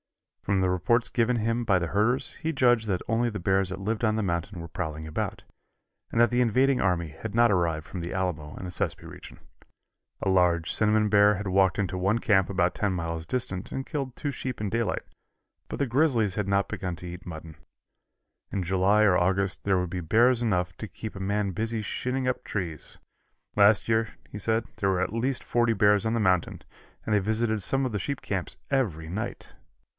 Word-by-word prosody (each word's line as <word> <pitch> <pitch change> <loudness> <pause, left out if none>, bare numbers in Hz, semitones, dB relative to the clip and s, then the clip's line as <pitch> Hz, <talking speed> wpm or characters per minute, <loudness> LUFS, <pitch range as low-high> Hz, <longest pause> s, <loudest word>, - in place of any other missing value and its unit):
From 100 -1 0
the 90 -1 +2
reports 115 +6 +2
given 120 +1 +1
him 115 +2 0
by 100 -5 +3
the 85 - -2
herders 110 +8 +1
he 160 0 0
judged 120 -6 +3
that 95 -3 -1
only 120 +1 +1
the 105 -2 -5
bears 95 +1 +1
that 95 0 -5
lived 110 +4 -2
on 110 -1 +2
the 110 - 0
mountain 85 +1 -2
were 85 - -6
prowling 80 -1 -5
about, 80 - -4 0.7
and - - 0
that 120 -2 +5
the 120 +1 +2
invading 130 +3 +3
army 90 -3 +1
had 100 +8 -7
not 120 -1 +5
arrived 85 -4 0
from 90 - -6
the 85 - -5
Alamo 85 -5 -3
and - - -7
the 90 - -5
Sespe - - -2
region. - - -11 0.8
A - - -2
large 90 -3 +3
cinnamon 105 0 +3
bear 105 0 +5
had 105 +1 -5
walked 95 0 +3
into 95 -2 -1
one 100 +5 +1
camp 100 -6 +2
about 90 -2 +1
ten 105 -2 0
miles 85 -2 -3
distant 100 -7 -2
and 135 - -4
killed 135 -4 -4
two 145 - -3
sheep 130 -1 -5
in 105 -2 -2
daylight, 115 +1 -1 0.7
but - - -4
the 140 - +2
grizzlies 120 - +2
had 105 -2 -2
not 100 0 +2
begun 90 -2 -4
to 90 - -9
eat 90 0 -8
mutton. 80 -2 -8 1.0
In 95 - -1
July 95 +4 +3
or 100 -4 +5
August 95 +2 0
there 95 -2 +2
would 90 -2 -3
be 90 0 -3
bears 120 +8 +3
enough 90 -6 0
to 110 - -6
keep 110 +1 -8
a - - -7
man 100 +1 -1
busy 110 +3 -2
shinning 125 +4 -2
up 125 0 -1
trees. 85 -7 -5 0.6
Last 100 0 +5
year, 110 -1 +1
he 105 - -7
said, 110 +2 0
there 100 - +1
were 95 -1 +1
at 95 +2 -2
least 125 +3 -1
forty 120 -1 +2
bears 105 +1 +3
on 110 +1 +1
the - - +1
mountain, 95 -5 +1 0.4
and 110 - 0
they 105 - +4
visited 110 +2 0
some 135 +8 +2
of 130 - -2
the 105 - -2
sheep 140 +8 -3
camps 95 -3 -4
every 95 - 0
night. 95 +7 -5
100 Hz, 210 wpm, -27 LUFS, 90-115 Hz, 1.0 s, that